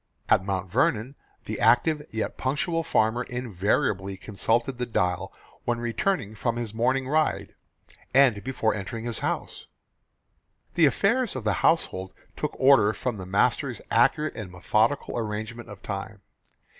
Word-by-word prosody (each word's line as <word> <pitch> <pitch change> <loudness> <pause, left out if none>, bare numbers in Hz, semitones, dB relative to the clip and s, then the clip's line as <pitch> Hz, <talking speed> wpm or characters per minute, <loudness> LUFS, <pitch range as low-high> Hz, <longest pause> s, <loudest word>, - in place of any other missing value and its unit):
At - - +4
Mount 95 -1 -2
Vernon 110 +5 +1 0.3
the - - -4
active 125 +7 +4
yet 110 0 -3
punctual 155 +5 -1
farmer 110 -3 +2
invariably 100 -5 -1
consulted 115 +6 -1
the 125 - -1
dial 90 -5 -1 0.3
when 120 -1 0
returning 120 - -1
from 115 +2 -1
his 120 -3 -4
morning 130 +3 +1
ride, 155 +2 0 0.6
and 130 -6 +4
before 125 -4 0
entering 110 +3 -5
his 120 -2 -3
house. - - -3 1.1
The 165 -3 +5
affairs 230 - +1
of 130 - -4
the 105 -2 +1
household 95 - +1 0.2
took - - -3
order 130 -6 +6
from 120 +2 -3
the 95 -2 -7
master's 95 +2 +1
accurate 155 0 +3
and 105 -5 -7
methodical 110 +9 +1
arrangement 110 +2 -5
of 100 -1 -11
time. 100 0 -6
115 Hz, 140 wpm, -26 LUFS, 105-130 Hz, 1.1 s, order